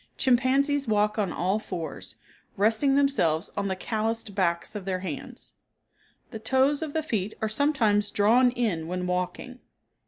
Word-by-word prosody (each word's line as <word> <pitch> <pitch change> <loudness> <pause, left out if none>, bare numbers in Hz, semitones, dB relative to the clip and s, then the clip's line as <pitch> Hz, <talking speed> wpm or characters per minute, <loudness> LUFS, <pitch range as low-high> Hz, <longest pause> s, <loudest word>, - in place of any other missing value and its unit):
Chimpanzees 270 +2 +2
walk 210 0 +1
on 195 -4 0
all 190 +6 0
fours, 175 -6 -6 0.4
resting 225 +7 +2
themselves 270 - +1
on 200 0 -1
the 190 - -1
calloused 220 +2 -2
backs 175 -3 0
of 205 -3 -6
their 185 -1 -2
hands. 190 - -7 0.8
The 220 - -6
toes 265 +6 +2
of 310 -2 -4
the 320 - -1
feet 215 - -2
are 220 - -1
sometimes 220 -5 +1
drawn 230 +5 +4
in 215 -10 -2
when 180 +1 -3
walking. 180 +8 -3
215 Hz, 150 wpm, -26 LUFS, 190-255 Hz, 0.8 s, drawn